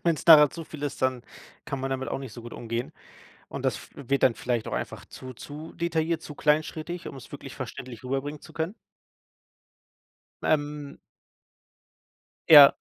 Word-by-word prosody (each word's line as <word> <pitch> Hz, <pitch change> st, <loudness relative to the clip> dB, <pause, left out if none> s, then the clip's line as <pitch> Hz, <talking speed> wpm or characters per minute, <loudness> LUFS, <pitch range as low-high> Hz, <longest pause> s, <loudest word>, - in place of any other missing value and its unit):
Wenn's 165 Hz, -3 st, 0 dB
nachher 150 Hz, -3 st, +9 dB
zu 165 Hz, -, -7 dB
viel 150 Hz, -1 st, -10 dB
ist, 145 Hz, -, -3 dB
dann 130 Hz, -2 st, 0 dB, 0.4 s
kann 140 Hz, -2 st, -4 dB
man 135 Hz, -, -2 dB
damit 130 Hz, 0 st, -2 dB
auch -, -, -2 dB
nicht 130 Hz, -5 st, -8 dB
so 120 Hz, -, -9 dB
gut 120 Hz, -, -9 dB
umgehen. 115 Hz, +1 st, -4 dB, 0.6 s
Und -, -, -7 dB
das -, -, +1 dB
f -, -, -12 dB
wird 140 Hz, 0 st, -1 dB
dann 115 Hz, -, +5 dB
vielleicht 120 Hz, -3 st, -2 dB
auch -, -, -7 dB
einfach -, -, -5 dB
zu 130 Hz, 0 st, -10 dB
zu 150 Hz, +6 st, -9 dB
detailliert, 165 Hz, -1 st, -1 dB
zu 150 Hz, -2 st, -9 dB
kleinschrittig, 155 Hz, +3 st, 0 dB
um's 135 Hz, -3 st, -11 dB
wirklich -, -, -8 dB
verständlich 125 Hz, -1 st, -8 dB
rüberbringen 135 Hz, +3 st, -3 dB
zu -, -, -13 dB
können? 165 Hz, +4 st, -2 dB, 1.7 s
Ähm 145 Hz, -1 st, -1 dB, 1.5 s
Ja. 145 Hz, -3 st, +10 dB
145 Hz, 165 wpm, -27 LUFS, 130-155 Hz, 1.7 s, Ja